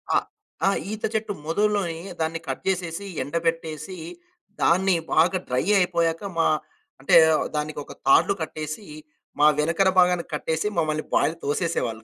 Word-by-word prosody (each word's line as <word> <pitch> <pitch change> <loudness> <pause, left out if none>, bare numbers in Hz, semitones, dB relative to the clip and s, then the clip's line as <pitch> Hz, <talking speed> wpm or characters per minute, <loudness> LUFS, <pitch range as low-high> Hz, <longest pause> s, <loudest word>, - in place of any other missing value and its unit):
ఆహ్, - - +2 0.4
ఆ! - - +6 0.2
ఈత 215 0 -6
చెట్టు 220 -1 -1
మొదుల్లోని 200 -2 0 0.2
దాన్ని 160 +1 -1
కట్ 130 - -4
చేసేసి, 180 0 -2 0.2
ఎండబెట్టేసి, 165 +3 -3 0.6
దాన్ని 185 +2 +3 0.2
బాగా 170 +4 +4
డ్రై 125 0 0 0.2
అయిపోయాక 170 -2 +1 0.2
మా 165 - +3 0.5
అంటే, 135 - +3 0.4
దానికొక 150 -1 -4
తాళ్లు 135 +8 +5
కట్టేసీ, 155 +4 -5 0.5
మా 150 - +6
వెనకన 165 +5 +2
భాగానికి 180 -1 +3
కట్టేసి, 160 +4 -1
మమ్మలని 155 -2 0
బాయిలో 160 - +2
తోసేసేవాళ్ళు. 140 -7 -1
165 Hz, 125 wpm, -24 LUFS, 155-185 Hz, 0.6 s, ఆ